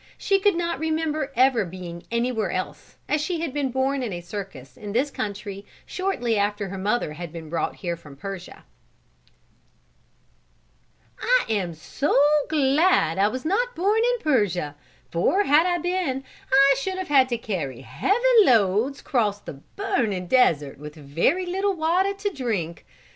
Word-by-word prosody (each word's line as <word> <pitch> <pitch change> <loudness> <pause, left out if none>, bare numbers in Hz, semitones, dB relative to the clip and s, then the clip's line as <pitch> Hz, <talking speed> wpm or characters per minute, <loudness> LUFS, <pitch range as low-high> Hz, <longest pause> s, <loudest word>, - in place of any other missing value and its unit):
She 395 -1 +2
could 405 -2 +3
not 340 0 -2
remember 315 -2 -1
ever 255 -3 +4
being 175 -1 -8
anywhere 235 -4 0
else, 185 +1 -5
as 300 0 +1
she 325 +1 -2
had 320 -6 -3
been 285 -2 -1
born 265 +2 0
in 240 -4 -3
a 175 - -4
circus 175 -7 -8
in 205 -1 -7
this 270 +5 +1
country 200 -2 -5 0.2
shortly 245 - -1
after 205 0 -1
her 195 - -6
mother 205 -4 0
had 170 +1 -7
been 160 -2 -9
brought 170 - -1
here 175 -3 -3
from 145 -4 -14
Persia. 195 +2 -8 2.6
"I - - +3
am 190 -6 -1
so 270 - -1 0.3
glad 280 - +3
I 200 - +5
was 255 +5 -4
not 485 +9 0
born 405 +5 +2 0.2
in 475 - -10
Persia, 195 - +1 0.4
for 275 - +2
had 315 +1 +4
I 350 -1 +1
been 350 -6 -1 0.3
I 275 +1 +6
should 375 +6 -3
have 375 -3 -5
had 265 -3 +5
to 240 - 0
carry 155 - -4
heavy 135 - 0 0.3
loads 230 - +2
and - - -29
cross 215 -7 +1
the - - -8 0.2
burning 240 - -1
desert 160 - +2
with 150 +1 -9
very 160 - 0
little 385 +2 0
water 360 +5 +1
to 400 +1 -2
drink. 215 - -3
245 Hz, 160 wpm, -24 LUFS, -, 2.6 s, I